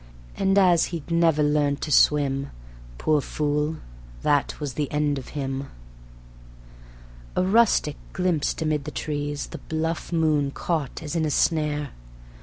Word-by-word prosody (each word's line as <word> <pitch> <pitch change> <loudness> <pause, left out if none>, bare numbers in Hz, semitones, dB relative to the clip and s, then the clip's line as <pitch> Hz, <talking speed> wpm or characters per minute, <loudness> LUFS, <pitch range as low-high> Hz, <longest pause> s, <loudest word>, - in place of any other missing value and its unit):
And 195 0 +2
as 180 -4 +5
he'd 170 -1 -6
never 165 -2 +3
learnt 145 -1 +1
to 155 - -3
swim, 140 -1 +3 0.5
Poor 150 - +2
fool! 150 +2 -1 0.5
that 145 -1 +1
was 145 -4 -4
the 145 0 -2
end 145 -1 0
of 130 - -10
him. 135 0 -3 1.7
A - - +2
rustic 195 -7 +3
glimpsed 175 -4 0
amid 150 -2 -1
the - - -4
trees 145 -1 -3
The - - -7
bluff 160 +2 -3
moon 155 -4 +2
caught 155 0 -3
as 155 +2 -5
in 165 - +1
a 155 - 0
snare. 150 -2 +1
150 Hz, 140 wpm, -25 LUFS, 145-165 Hz, 1.7 s, as